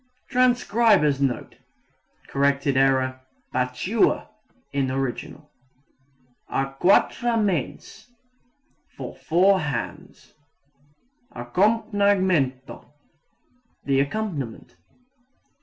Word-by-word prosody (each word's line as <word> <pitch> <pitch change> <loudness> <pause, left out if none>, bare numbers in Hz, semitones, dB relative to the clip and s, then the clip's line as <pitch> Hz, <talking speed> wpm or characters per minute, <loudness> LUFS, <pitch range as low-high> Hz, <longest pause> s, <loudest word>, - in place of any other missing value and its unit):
[Transcriber's 230 - +3
Note: 135 -3 -2 0.7
Corrected 140 0 +1
error 130 -1 +2 0.3
"battua" 130 - 0 0.4
in 135 -2 0
original.] 130 -1 -4 1.0
À 135 0 -2
quatre 235 +5 +3
mains 195 - -3 0.9
for - - -7
four 190 +4 +3
hands. 145 -8 -6 1.0
Accompagnamento 185 - 0 1.0
the 135 -1 +2
accompaniment. 140 - -3
140 Hz, 60 wpm, -24 LUFS, 135-205 Hz, 1.0 s, Transcriber's